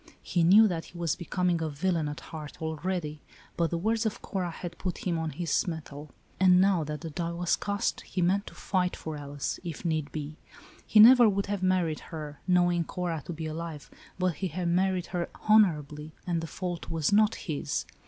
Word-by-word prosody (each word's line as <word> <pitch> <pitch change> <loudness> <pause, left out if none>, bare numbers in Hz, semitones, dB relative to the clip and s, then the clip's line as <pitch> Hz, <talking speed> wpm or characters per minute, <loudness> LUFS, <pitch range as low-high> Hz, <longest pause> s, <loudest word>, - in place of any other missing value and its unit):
He 175 - +1
knew 205 +6 +7
that 170 -4 -3
he 175 - -13
was 170 -4 0
becoming 180 -1 -1
a 160 - -1
villain 160 +1 0
at 145 - -7
heart 155 -2 -9
already,' 160 -1 -3 0.3
but 170 -1 +1
the 170 - -1
words 220 +6 0
of 220 - -2
Cora 185 -3 -2
had 170 +1 -7
put 180 -2 -4
him 170 -3 0
on 160 -1 -2
his 165 +3 -1
mettle, 155 -3 -6 0.3
and 180 -1 +6
now 190 -3 +3
that 150 0 -5
the 165 -2 -6
die 170 +2 -3
was 175 0 +1
cast, 200 0 -2
he 185 - -6
meant 190 +3 +2
to - - -10
fight 180 -2 0
for 160 -1 -6
Alice, 145 -1 -4
if 170 0 -6
need 155 -3 -1
be. 150 0 -6 0.5
He 215 - +5
never 240 +1 +9
would 200 0 0
have 205 -1 -3
married 185 -4 +1
her, 150 -3 -7
knowing 175 -1 +3
Cora 170 -2 -3
to 175 - -4
be 160 0 -5
alive, 155 -1 -6 0.3
but 185 -1 +1
he 190 - -1
had 175 +1 -2
married 185 0 +1
her 175 -1 -1 0.2
honorably, 155 -8 +3
and 170 -2 -1
the 165 - -5
fault 175 +2 -5
was 165 +3 0
not 215 +1 +4
his. 140 - -3
170 Hz, 200 wpm, -28 LUFS, 155-185 Hz, 0.5 s, never